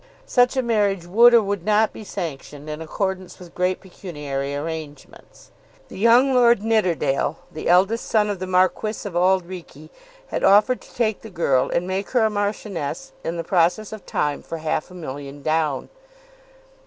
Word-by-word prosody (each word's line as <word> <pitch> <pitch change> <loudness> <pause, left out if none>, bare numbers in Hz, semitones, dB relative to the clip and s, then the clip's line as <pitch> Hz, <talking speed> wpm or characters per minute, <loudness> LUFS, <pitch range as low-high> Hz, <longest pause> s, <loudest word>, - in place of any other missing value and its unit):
Such 245 +1 +2
a 260 - +2
marriage 205 -6 +1
would 230 +7 +6
or 235 -2 +6
would 200 -3 -3
not 215 +2 +2
be - - -9
sanctioned 150 -6 -6
in 150 +1 -5
accordance 190 +3 -3
with 175 -2 -13
great 180 +1 0
pecuniary 145 -7 -5
arrangements. 150 -2 -8 0.4
The - - -9
young 240 +5 +5
Lord 240 -4 +4
Nidderdale, 170 -10 +1
the 155 - -4
eldest 195 +6 +3
son 215 -2 +2
of 205 -3 -3
the 185 - -4
Marquis 185 +4 +1
of 185 - -8
Auld 185 +1 +3
Reekie, 165 -4 -10 0.4
had - - -3
offered 210 +6 +5
to - - -18
take 220 -3 0
the 220 - -10
girl 140 -8 +1
and 170 - 0
make 190 +2 -3
her 220 -2 +4
Marchioness 205 - -3
in 170 +1 -3
the 165 - -3
process 180 +5 +1
of 215 -2 -8
time 145 -1 -1
for 165 - -6
half 155 +1 -2
a 180 - -13
million 145 -3 -8
down. 155 -2 0
185 Hz, 170 wpm, -22 LUFS, 160-215 Hz, 0.4 s, would